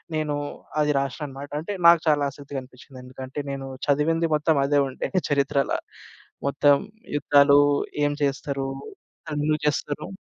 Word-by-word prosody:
నేను 150 -1 -1 0.4
అది 150 0 +3
రాశ్నననమాట 140 0 -5
అంటే 200 +6 -4
నాకు 170 0 +8
చాలా 145 -2 +3
ఆసక్తిగా 140 0 -7
అనిపిచ్చింది. 130 +1 -15
ఎందుకంటే 130 +2 -8
నేను 135 -1 -5 0.2
చదివింది 165 +4 +2
మొత్తం 155 +1 +2
అదే 145 0 +3
ఉండే - - -4 0.2
చరిత్రల. 140 0 +1 0.8
మొత్తం 140 0 +4 0.4
యుద్ధాలు 145 0 +5 0.5
ఏం 145 - +1
చేస్తరు? 135 0 -1 0.7
ఎందుకు 150 +1 0
చేస్తరు? 145 0 -1
145 Hz, 125 wpm, -24 LUFS, 140-150 Hz, 0.8 s, నాకు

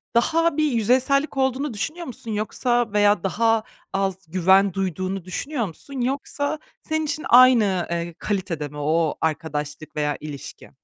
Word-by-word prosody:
daha 330 +6 +2
bir 305 -2 +2
yüzeysellik 260 +6 +2
olduğunu 265 0 0
düşünüyor 330 - -4
musun, 230 -2 -6
yoksa 240 +2 0
veya 205 -2 +3
daha 225 +3 +2 0.3
az 195 -1 0
güven 190 +2 +4
duyduğunu 190 0 -3
düşünüyor 245 +6 -3
musun, 255 - -7
yoksa 285 +3 -2 0.2
senin 315 0 -1
için 305 +1 -3
aynı, 230 -8 +6
eee, 170 -1 -3
kalitede 185 -7 -2
mi 150 +1 -11
o 155 +2 +1
arkadaşlık 155 -1 -3
veya 150 -1 -1
ilişki? 145 -2 -9
205 Hz, 140 wpm, -23 LUFS, 170-260 Hz, 0.3 s, aynı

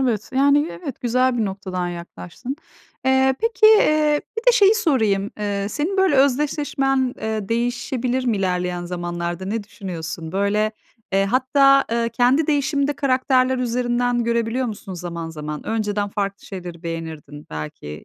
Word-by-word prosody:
Evet, 230 -5 -1
yani, 285 +2 +4
evet, 175 +11 -7
güzel 255 +1 +1
bir 220 - +1
noktadan 190 -2 -3
yaklaştın. 175 - -7 0.5
Eee, 265 0 +3
peki, 455 -1 +3
eee, 305 -8 +5 0.2
bir 450 - -2
de - - +8
şeyi 425 -2 +6
sorayım, 220 - +1
eee, 200 -1 -2
senin 325 - -2
böyle 380 -5 +3
özdeşleşmen, 270 -1 +1
eee, 220 -2 -3
değişebilir 245 +2 -1
mi 230 -4 +1
ilerleyen 180 -2 -1
zamanlarda? 175 0 -4
Ne 210 +2 -2
düşünüyorsun, 170 -4 -6
böyle, 210 +2 +1 0.4
eee, 195 0 +3
hatta, 275 +4 +4
eee, 230 0 +1
kendi 250 +6 +2
değişimini 285 -1 +1
de 290 - +1
karakterler 260 -1 +2
üzerinden 245 0 0
görebiliyor 235 +2 0
musun 200 -3 -6
zaman 170 -2 -5
zaman? 150 -1 -6
Önceden 210 -2 -1
farklı 200 -1 -4
şeyleri 180 -3 -8
beğenirdin 160 -3 -7
belki, 75 -1 -7
230 Hz, 145 wpm, -21 LUFS, 185-265 Hz, 0.5 s, de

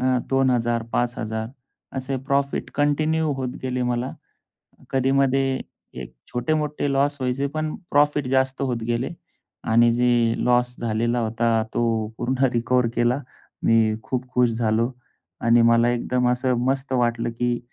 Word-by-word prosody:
अ, - - -1 0.3
2000-5000 120 -3 0 0.5
असे 130 +1 -2
profit 140 0 0
continue 155 +2 +1
होत 130 -1 -2
गेले 125 -1 -2
मला. 125 +1 -1 0.8
कधीमध्ये 135 0 +2 0.6
एक 60 0 -9
छोटे-मोठे 150 +3 -1
लॉस 140 +1 +2
व्हायचे. 130 +2 -1
पण 155 0 -2 0.2
प्रॉफिट 145 -1 +2
जास्त 130 0 +1
होत 125 -3 0
गेले. 120 +2 -1 0.5
आणि 115 +1 +4
जे 125 +1 +2 0.4
लॉस 125 0 +2
झालेला 115 +1 0
होता. 115 0 +1
तो 115 -2 0
पूर्ण 130 +2 +1
रिकव्हर 120 +1 +2
केला. 120 +3 +2 0.4
मी 110 -1 +3
खूप 130 0 -3
खुश 125 -1 +3
झालो. 115 +1 0 0.5
आणि 115 0 +4
मला 115 +1 +4
एकदम 125 +1 0
असं 125 0 +1
मस्त 135 0 -1
वाटलं 120 -2 +1
की 120 -1 0
125 Hz, 130 wpm, -23 LUFS, 115-135 Hz, 0.8 s, आणि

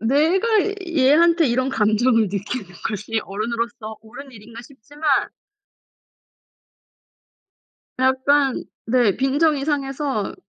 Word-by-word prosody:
내가 310 - +2 0.4
얘한테 330 +2 +3
이런 255 +2 0
감정을 225 0 +2
느끼는 205 +3 -4 0.2
것이 220 +1 -3
어른으로서 220 +1 -4
옳은 245 +5 -12
일인가 230 +1 -12
싶지만 285 +4 -11 2.9
약간 265 +1 +2 0.2
네 230 -4 +2
빈정이 280 +2 +1
상해서 275 -6 -2
260 Hz, 210 characters per minute, -21 LUFS, 225-285 Hz, 2.9 s, 얘한테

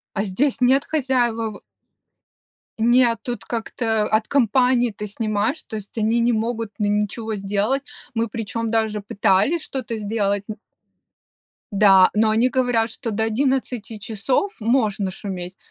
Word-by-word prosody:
А 200 - 0
здесь 250 +8 0
нет 265 +3 +4
хозяевов. 240 -7 0 1.2
Нет, 235 0 +4
тут 245 -1 -5
как-то 225 -1 -1
от 215 +1 0
компании 250 -1 +3
ты 210 - -5
снимаешь, 215 +6 -1
то 220 - -7
есть 210 +1 -9
они 225 +2 +2
не 235 +1 +3
могут 225 0 -2
н 210 0 +2
ничего 220 +1 -4
сделать. 205 +7 0 0.3
Мы 230 0 0
причем, 225 +1 -3
даже 220 -2 0
пытались 200 - +2
что-то 235 -4 -4
сделать 205 -1 -1
н 215 - -5 1.2
Да, 195 -2 +6
но 215 +1 +3
они 225 +4 +3
говорят, 245 -3 +1
что 230 +1 -5
до 220 +1 0
11 245 -2 -1
часов 225 - -1
можно 215 -4 +1
шуметь. 185 -1 -6
225 Hz, 140 wpm, -22 LUFS, 210-245 Hz, 1.2 s, Да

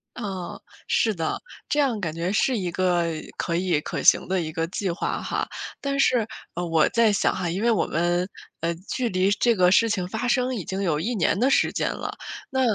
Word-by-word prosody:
啊， 190 -3 -5 0.3
是 220 - +2
的， 165 -2 -2 0.3
这 295 - +1
样 255 -7 +2
感 165 -4 -2
觉 170 +3 -2
是 250 +3 +2
一 185 -4 -2
个 175 -1 +1 0.3
可 170 - -1
以 175 -3 +1
可 - - -4
行 - - +5
的 185 -1 +1
一 160 -1 -4
个 165 +1 -2
计 190 +2 -2
划 170 - -2
哈。 - - -2 0.3
但 275 0 -2
是， 245 -5 +3 0.3
嗯， 175 0 -3
我 160 -2 +4
在 230 -2 +3
想 - - +2
哈， 180 -2 -2
因 185 +6 -2
为 235 - +4
我 215 - +2
们， 175 +2 +1 0.3
呃， 165 +1 0 0.2
距 255 -2 0
离 185 +1 +2
这 235 +2 +3
个 180 -1 +4
事 230 +4 +5
情 185 -3 0
发 220 +6 -3
生 255 +1 +1
已 195 - -4
经 190 0 -3
有 160 -5 +1
1 230 +9 -1
年 190 +1 +1
的 255 - +3
时 - - +3
间 - - -1
了。 - - -5 0.4
那 265 -2 0
190 Hz, 230 characters per minute, -25 LUFS, 175-230 Hz, 0.4 s, 行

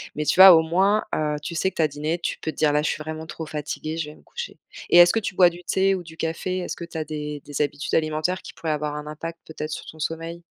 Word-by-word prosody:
Mais 150 - -1
tu 150 - +1
vois 190 -1 +12
au 160 - +6
moins, 190 +6 +2
heu, 150 -1 0
tu 170 - -4
sais 190 +3 +1
que - - -21
tu - - 0
as 155 - +3
dîné, 150 +3 -2
tu 170 - -3
peux 160 - -3
te - - -20
dire: 150 - +3
«Là 150 0 +2
je 150 - -1
suis 155 - -3
vraiment 160 +1 -6
trop 160 0 -6
fatiguée, 155 +1 -5
je 155 -2 -3
vais - - -15
me - - -20
coucher». 480 0 -7 0.3
Et - - +6
est-ce 175 0 +9
que 225 - +1
tu 205 -3 -4
bois 180 -1 +7
du 175 +1 -11
thé 195 0 +2
ou 180 - -5
du 165 -1 -12
café? 165 +3 -2
Est-ce 180 - -4
que 170 - -6
tu 170 - -8
as 160 - -1
des 150 -1 -5
des 145 0 -3
habitudes 145 0 -2
alimentaires 155 +3 0
qui - - -10
pourraient 160 - -3
avoir 150 -1 -2
un 150 0 -6
impact, 165 +2 -6
peut-être, 155 -1 -6
sur - - -5
ton 160 - -12
sommeil? 165 +2 -4
160 Hz, 300 wpm, -24 LUFS, 150-175 Hz, 0.3 s, vois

